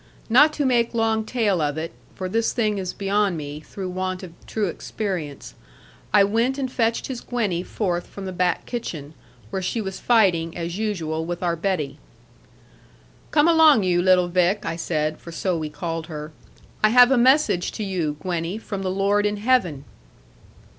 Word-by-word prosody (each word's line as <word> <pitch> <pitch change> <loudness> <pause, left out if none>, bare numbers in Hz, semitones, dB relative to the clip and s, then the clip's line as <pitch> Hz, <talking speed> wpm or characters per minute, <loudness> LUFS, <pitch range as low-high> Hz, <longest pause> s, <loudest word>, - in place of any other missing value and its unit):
Not 295 +6 +7
to 290 - -1
make 240 -2 +2
long 225 -1 +1
tale 215 -8 +1
of 145 0 -1
it 165 +1 -4 0.2
for 185 - -4
this 225 +4 0
thing 215 -4 0
is 185 -2 -3
beyond 200 -2 0
me, 145 -1 -6
through 185 +4 -7
want 185 0 -3
of 175 -3 -9
true 215 -2 -1
experience 175 -5 -5 0.6
I 205 -1 +6
went 230 +6 +1
and 265 -2 -2
fetched 230 -2 0
his 255 -3 -5
Gwenny 210 -8 -1
forth 180 -2 -2
from 200 - -8
the 190 - -4
back 180 0 0
kitchen, 160 - -5 0.4
where 190 - -2
she 185 +5 -2
was 190 -3 -4
fighting, 180 -9 +2
as 170 0 -4
usual, 165 -7 -2
with 175 +2 -4
our 170 -1 +1
Betty. 165 -5 -2 1.3
'Come 300 +1 +4
along, 320 -9 +6
you 175 -1 +2
little 180 -1 +4
Vick,' 180 +3 +1
I - - -2
said, 155 -2 -2
for 170 - -10
so 180 +2 -1
we 155 -2 -3
called 165 +1 -4
her; 155 -1 -7 0.5
'I 215 - +6
have 245 +2 +7
a - - +5
message 255 - +3
to 215 - -4
you, 170 -7 -2
Gwenny, 175 +2 -2
from 205 -3 -5
the 190 - -2
Lord 200 +2 +2
in 210 0 -2
heaven.' 205 - +1
190 Hz, 180 wpm, -23 LUFS, 170-225 Hz, 1.3 s, Not